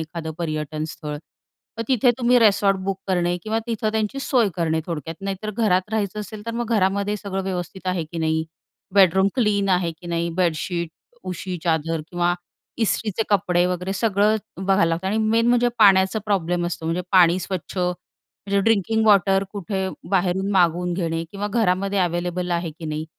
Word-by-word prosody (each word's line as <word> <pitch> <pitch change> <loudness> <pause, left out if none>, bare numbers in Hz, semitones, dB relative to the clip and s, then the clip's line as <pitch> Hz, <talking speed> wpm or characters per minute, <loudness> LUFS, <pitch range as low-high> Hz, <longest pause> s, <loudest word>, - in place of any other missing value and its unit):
एखादं 160 0 -5
पर्यटनस्थळ. 155 -1 -4 0.6
तर - - 0
तिथे 255 -1 +4
तुम्ही 245 0 +4
रिसॉर्ट 200 -3 +4
बुक 195 0 -2
करणे 175 -1 +1
किंवा 220 +1 -1
तिथं 225 -2 -1
त्यांची 220 +4 -1
सोय 250 -5 +2
करणे 160 -2 0
थोडक्यात. 165 -1 -4
नाहीतर 195 +2 -4
घरात 200 -3 +1
राहायचं 210 -1 -1
असेल 210 +1 -9
तर - - -1
मग 235 -1 -3
घरामध्ये 200 +1 +1
सगळं 195 -2 -4
व्यवस्थित 185 0 -5
आहे 180 -3 -1
की 165 +2 -7
नाही 160 0 0 0.5
बेडरूम 190 0 +5
क्लीन 210 -5 +1
आहे 180 -2 +2
की 175 - -11
नाही 170 0 -1
बेडशीट, 170 -1 0 0.4
उशी, 180 +1 -4
चादर 165 -1 0
किंवा 175 0 +1 0.5
इस्त्रीचे 220 -1 0
कपडे 180 -3 +2
वगैरे 180 +1 -2
सगळं 205 +1 +2 0.3
बघायला 195 -1 +3
लागतं 165 +3 -2
आणि 200 +3 0
मेन 225 +1 +2
म्हणजे 245 0 +4
पाण्याचा 195 -1 +5
प्रॉब्लेम 175 -4 0
असतो 175 -1 -5
म्हणजे 170 +2 -1
पाणी 180 -1 +6
स्वच्छ 185 +1 -5
म्हणजे 180 +2 -3
ड्रिंकिंग 220 +1 +2
वॉटर 195 -1 +4
कुठे 195 -1 -3 0.2
बाहेरून 190 +1 +1
मागवून 180 -1 +2
घेणे 165 -2 -2
किंवा 205 +1 -4
घरामध्ये 200 -2 +1
अवेलेबल 175 0 -1
आहे 170 -1 -1
की 165 - -8
नाही 155 0 -3
190 Hz, 165 wpm, -22 LUFS, 175-205 Hz, 0.6 s, पाणी